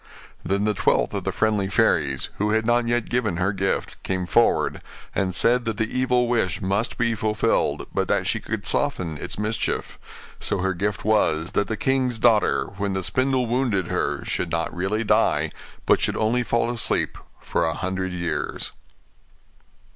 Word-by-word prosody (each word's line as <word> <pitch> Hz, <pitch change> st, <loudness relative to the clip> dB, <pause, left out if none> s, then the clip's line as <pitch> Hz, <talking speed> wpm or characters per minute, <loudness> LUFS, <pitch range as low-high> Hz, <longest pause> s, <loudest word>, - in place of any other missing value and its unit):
Then 100 Hz, +1 st, 0 dB
the 105 Hz, 0 st, +2 dB
twelfth -, -, +1 dB
of -, -, -3 dB
the -, -, 0 dB
friendly 105 Hz, -3 st, +1 dB
fairies, 65 Hz, -7 st, +1 dB
who 105 Hz, +1 st, +1 dB
had 110 Hz, 0 st, +1 dB
not 120 Hz, 0 st, +2 dB
yet 120 Hz, -1 st, 0 dB
given 110 Hz, -8 st, 0 dB
her 95 Hz, +3 st, +1 dB
gift, 95 Hz, 0 st, -2 dB
came 95 Hz, -1 st, -2 dB
forward, 75 Hz, -8 st, +2 dB, 0.3 s
and 95 Hz, -2 st, -1 dB
said 120 Hz, +6 st, +3 dB
that 115 Hz, -2 st, -2 dB
the 110 Hz, +1 st, -2 dB
evil 125 Hz, -1 st, +2 dB
wish 110 Hz, -8 st, 0 dB
must 100 Hz, +4 st, -1 dB
be 115 Hz, -1 st, +1 dB
fulfilled, 110 Hz, 0 st, 0 dB
but -, -, 0 dB
that -, -, +1 dB
she -, -, 0 dB
could -, -, -4 dB
soften 80 Hz, -3 st, -1 dB
its -, -, -5 dB
mischief; 105 Hz, +1 st, -2 dB, 0.4 s
so -, -, 0 dB
her 95 Hz, +1 st, 0 dB
gift 100 Hz, +2 st, -2 dB
was, 90 Hz, -6 st, +2 dB
that 100 Hz, -, 0 dB
the 110 Hz, -, -3 dB
king's 130 Hz, -2 st, +1 dB
daughter, 110 Hz, -2 st, +3 dB
when 100 Hz, -1 st, -1 dB
the 95 Hz, 0 st, -2 dB
spindle 130 Hz, +4 st, +1 dB
wounded 115 Hz, -7 st, 0 dB
her, -, -, -1 dB
should 85 Hz, -, -2 dB
not 85 Hz, 0 st, -1 dB
really 95 Hz, +5 st, -1 dB
die, 105 Hz, -, +2 dB, 0.3 s
but -, -, +4 dB
should -, -, 0 dB
only 115 Hz, +3 st, +2 dB
fall 115 Hz, 0 st, 0 dB
asleep 120 Hz, -3 st, 0 dB, 0.2 s
for -, -, -1 dB
a 80 Hz, -1 st, 0 dB
hundred 95 Hz, 0 st, -2 dB
years. 85 Hz, -3 st, -3 dB
105 Hz, 175 wpm, -24 LUFS, 95-115 Hz, 0.4 s, but